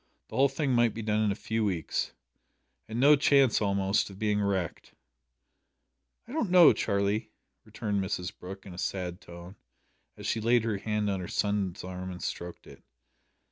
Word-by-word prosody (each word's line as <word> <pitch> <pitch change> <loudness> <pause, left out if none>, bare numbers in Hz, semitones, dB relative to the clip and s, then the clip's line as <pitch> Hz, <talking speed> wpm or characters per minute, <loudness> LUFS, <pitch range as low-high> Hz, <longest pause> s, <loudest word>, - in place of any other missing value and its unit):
The - - -8
whole 135 +1 +4
thing 135 0 -1
might 120 -2 +3
be 115 - -5
done 105 0 +1
in 105 - +2
a - - -2
few 110 +1 -2
weeks; 90 -7 -1 0.8
and 110 +2 -4
no 145 +3 +7
chance, 140 -5 +4
almost, 100 -1 +1
of 95 - -11
being 105 0 0
wrecked." 95 -4 -2 1.3
"I - - -11
don't 265 - -1
know, 175 -3 +8
Charlie," 100 +2 0 0.4
returned 100 -2 -2
Mrs 95 0 -3
Brooke, 95 +1 -9
in 95 - -9
a 90 - -8
sad 90 -1 -3
tone, 85 +2 -11 0.6
as - - -9
she 110 - 0
laid 120 +1 +3
her 110 -3 -1
hand 105 0 -1
on 100 -2 -1
her 90 - -5
son's 100 -3 -1
arm 90 0 -6
and 90 -1 -7
stroked 85 0 -5
it. - - -14
105 Hz, 180 wpm, -29 LUFS, 95-115 Hz, 1.3 s, know